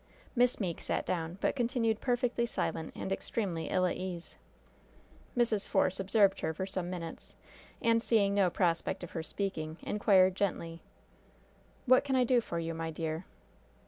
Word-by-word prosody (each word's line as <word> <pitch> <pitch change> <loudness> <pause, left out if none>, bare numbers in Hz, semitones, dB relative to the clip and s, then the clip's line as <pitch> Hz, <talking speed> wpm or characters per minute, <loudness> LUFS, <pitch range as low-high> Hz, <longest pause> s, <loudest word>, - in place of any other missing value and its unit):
Miss 245 0 +3
Meeke 180 -6 -2
sat - - -1
down, 170 0 -2
but - - +1
continued 235 -3 0
perfectly 245 -1 +1
silent 160 -7 -2
and 190 - -4
extremely 195 -4 -2
ill 185 -1 +2
at 180 - 0
ease. 180 -2 -5 1.0
Mrs. 225 -4 +2
Force 185 +1 +2
observed 195 0 +3
her 160 0 -1
for 190 - -2
some 185 -2 -3
minutes, 170 -3 -6 0.5
and 230 0 +4
seeing 210 -4 +3
no 200 -2 +4
prospect 170 -1 0
of 175 - -7
her 165 - -3
speaking, 160 -2 -4
inquired 190 -3 +4
gently: 170 -4 -2 1.0
"What 255 -1 +6
can 275 -2 0
I 255 - +4
do 245 0 +3
for 170 - -5
you, 165 0 -2
my 165 0 -3
dear?" 160 +1 -3
190 Hz, 160 wpm, -32 LUFS, 170-230 Hz, 1.0 s, What